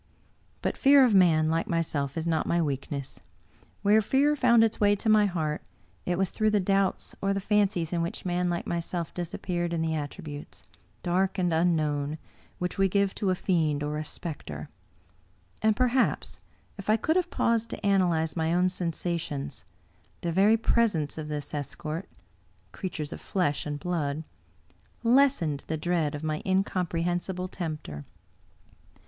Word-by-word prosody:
But - - -1
fear 275 -1 +7
of 235 - +2
man 165 -5 +5
like 165 +1 0
myself 155 -4 -1
is 160 - -2
not 165 -1 0
my 170 - +2
weakness; 140 -2 -3 0.6
where 210 +2 +5
fear 280 +7 +3
found 235 -4 +5
its 225 -1 +1
way 205 -1 +4
to 220 +2 -1
my 215 -1 +5
heart, 155 -5 -2 0.5
it 175 -1 +1
was 190 -1 0
through 215 -1 +1
the 210 -1 +3
doubts 195 0 +1
or 195 0 +1
the - - 0
fancies 195 -5 +1
in 170 - +1
which 170 +2 -4
man 180 0 0
like 170 0 -2
myself 170 0 -3
disappeared 175 0 -3
in 165 -1 0
the 160 0 0
attributes, 145 -1 -6 0.4
dark 185 +3 +1
and 180 -3 +1
unknown, 155 -3 +1 0.4
which 180 +2 -3
we 195 0 +4
g^ve 200 0 +2
to 200 - -1
a 185 - +2
fiend 155 -6 +1
or 150 +1 -2
a - - -3
specter. 140 - -6 0.9
And, 220 0 +3
perhaps, 255 +2 +1 0.4
if 200 - -6
I 215 - +5
could 315 +9 0
have 360 -1 +1
paused 230 -6 +1
to - - -5
analyze 175 -5 +2
my 160 0 +1
own 180 +1 +3
sensa 175 -1 -2
tions, 140 -3 -6 0.6
the 170 - -1
very 200 +6 +5
presence 205 -11 +1
of 155 - -5
this 150 -1 -4
escort 155 +4 -4 0.3
— 95 +1 -36
creatures 155 -6 -5
of - - -9
flesh 150 -7 -1
and 145 0 -3
blood 155 -3 -2 0.4
— - - -27
^lessened 235 - +3
the 160 - -2
dread 160 -2 0
of 145 - -6
my 155 -1 -2
incomprehensible 180 -1 -1
tempter. 155 - -5
175 Hz, 165 wpm, -28 LUFS, 155-195 Hz, 0.9 s, fear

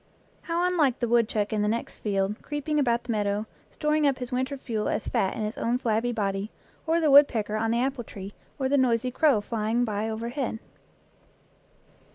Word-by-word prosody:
How 340 +1 -1
unlike 305 -9 +2
the 240 - -1
woodchuck 225 -3 +1
in 210 - +1
the 210 - +1
next 230 +2 -3
field, 200 0 -1
creeping 295 +1 -2
about 240 -4 +1
the 245 - -4
meadow, 205 -1 0 0.2
storing 300 0 +1
up 275 -2 +1
his 250 0 -5
winter 260 +3 -1
fuel 225 -5 -2
as - - -2
fat 190 - 0
in 220 - -3
his 215 +2 -4
own 235 +2 +1
flabby 235 -1 0
body, 200 -2 -2 0.4
or 330 +1 +3
the 310 -3 +3
woodpecker 235 -7 +5
on 225 +1 0
the 235 +1 +1
apple 265 -1 -1
tree, 200 -2 -9 0.2
or 265 - 0
the 280 +1 +3
noisy 250 -1 +2
crow 270 -5 +3
flying 225 +2 0
by 215 0 -2
overhead! 235 +2 -3
235 Hz, 190 wpm, -26 LUFS, 215-270 Hz, 0.4 s, woodpecker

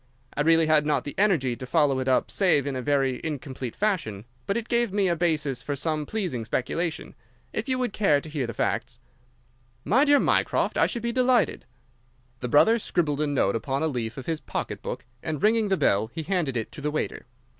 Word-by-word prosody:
I - - 0
really 165 +1 +4
had 155 -1 +4
not 150 0 0
the 145 - -6
energy 160 - +2
to 130 +1 -8
follow 145 -2 +2
it 130 - -3
up 130 - +2
save 175 -8 +3
in 140 -2 -2
a 130 - -2
very 135 -1 +1
incomplete 135 -5 -5
fashion, 165 - -1 0.2
but 200 - 0
it 235 0 -4
gave 235 -3 +1
me 200 -1 +1
a 170 - +2
basis 155 -6 0
for 145 - -3
some 150 +1 -2
pleasing 180 - -2
speculation. 160 +8 -3 0.4
If - - -3
you 255 - +2
would 250 -4 -1
care 195 -9 +3
to 150 - -8
hear 145 -5 -3
the 115 - -5
facts—" 120 +1 -2 0.9
"My 250 +9 +4
dear 290 -1 +5
Mycroft, - - +1
I - - +4
should 235 - -5
be 235 - 0
delighted." 250 -5 +2 0.7
The 125 - -4
brother 225 - +5
scribbled 155 -8 0
a 150 - +1
note 130 -9 +1
upon 135 +5 -2
a - - +2
leaf 120 -5 -3
of 135 - -6
his 165 -2 -2
pocket - - -4
book, - - -5 0.2
and, 155 -3 -4
ringing 220 0 +3
the 190 - +2
bell, 105 - +2
he 160 - -5
handed 160 -7 -1
it 110 - -4
to - - -10
the 150 - -1
waiter. 150 - -3
150 Hz, 215 wpm, -26 LUFS, 130-195 Hz, 0.9 s, dear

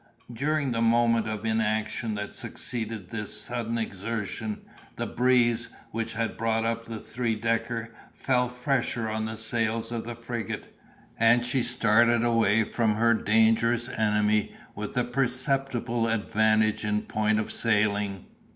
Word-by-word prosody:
During 145 +2 0
the 115 -1 -1
moment 115 0 +3
of 110 0 -4
inaction 110 0 0
that 105 0 -5
succeeded 110 -6 -5
this 105 -2 -4
sudden 115 -1 -3
exertion, 110 0 -4 0.3
the - - -3
breeze, 120 -2 +2 0.2
which 115 0 -3
had 115 0 -2
brought 115 0 0
up 115 0 -2
the 115 -1 -6
three 115 +1 -2
decker, 115 +1 -2 0.2
fell 125 -2 0
fresher 125 -2 -1
on 110 0 -2
the 110 0 -5
sails 115 0 0
of 115 -1 -3
the 120 0 -6
frigate, 115 -2 -5 0.4
and 120 +2 +5
she 125 +2 +2
started 120 0 +3
away 115 -2 +3
from 110 0 0
her 115 +2 +4
dangerous 115 +2 +3
enemy 105 -1 +1 0.2
with 105 +3 -6
a 125 - +3
very 120 - -8
perceptible 125 -2 0
advantage 110 -1 +2
in 105 0 0
point 110 0 +1
of 110 - -3
sailing. 105 -3 +1
115 Hz, 140 wpm, -27 LUFS, 110-120 Hz, 0.4 s, and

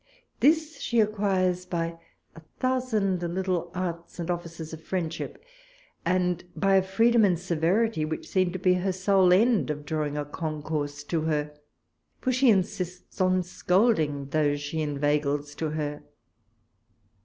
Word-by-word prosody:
This 315 +2 +3
she 235 - +1
acquires 190 -4 +1
by 165 -1 -3 0.4
a - - -10 0.2
thousand 225 -8 0
little 175 0 -1
arts 170 -2 -4
and 175 0 -2
offices 170 -2 -6
of 160 - -8
friendship: 170 - -4 0.6
and 180 0 +1
by 195 0 +2
a - - +5
freedom 225 +5 +3
and 185 -4 +4
severity, 175 +3 +1
which 155 +1 -4
seem 185 -2 +1
to 185 - -4
be 185 0 +3
her 185 +1 0
sole 190 -1 +3
end 220 +2 +4
of 150 -1 -4
drawing 150 -1 -2
a 145 - -2
con 155 0 -4
course 145 -2 -3
to 160 +2 -1
her; 150 -1 -1 0.7
for 255 - 0
she 255 +1 +4
insists 185 -2 -1
on 185 0 +3
scolding 180 - +1
those 145 -1 +1
she 145 +2 -3
inveigles 145 0 0
to 160 +1 -3
her. 150 -1 -3
175 Hz, 145 wpm, -27 LUFS, 155-190 Hz, 0.7 s, a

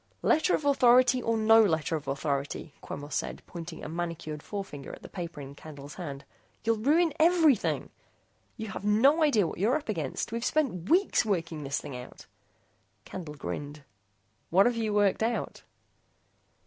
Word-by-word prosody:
"Letter 320 +4 +3
of 300 - -4
authority 255 -2 +5
or 230 -1 0
no 225 +1 +6
letter 160 -4 +1
of 150 - -6
authority," 140 +1 -3
Quemos 145 +1 -7
said, - - -3
pointing 165 -1 -8
a - - -5
manicured 165 -2 -4
forefinger 190 -10 -6
at - - -11
the - - -8
paper 170 -5 -6
in 140 0 -9
Candle's 145 -1 -10
hand, 140 -6 -7 0.4
"you'll 225 0 +2
ruin 310 +7 +3
everything! 320 - +3 0.7
You 220 -2 -5
have - - -6
no 245 +10 +4
idea 275 - +4
what 165 - -5
you're 225 +9 +3
up 295 - -10
against. 160 -6 -3
We've 230 0 -3
spent 250 - 0
weeks 370 +4 +3
working 165 -6 -2
this 140 0 -2
thing 135 - -8
out 125 0 -10 0.4
" 95 +3 -42
Candle 165 -5 -7
grinned. 145 +1 -6 0.7
"What've 200 +8 +4
you 225 -2 -1
worked 205 -1 +2
out?" 230 +1 -2
195 Hz, 160 wpm, -29 LUFS, 150-240 Hz, 0.7 s, no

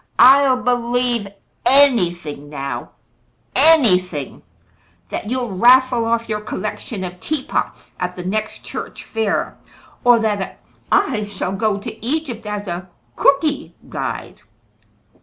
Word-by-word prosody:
"I'll 260 0 +6
believe 245 -2 0 0.4
anything 175 - +2
now 140 -4 -5 0.7
anything: 185 - +3 0.7
that 210 - -4
you'll 245 -5 -2
raffle 250 +2 +5
off 230 0 0
your 215 -1 -2
collection 215 -1 -5
of 180 0 -6
teapots 300 +3 -3
at 180 0 -3
the 180 - -7
next 215 +3 -3
church - - -7
fair, 220 -2 -2 0.4
or 245 -1 +6
that 210 -3 -2 0.3
I 215 -7 +2
shall 195 -2 -3
go 215 0 0
to 205 - -8
Egypt 245 -5 -3
as 210 -1 -4
a 175 +1 -5 0.3
'Cooky' 285 +2 +2
guide. - - -5
220 Hz, 115 wpm, -19 LUFS, 185-255 Hz, 0.7 s, I'll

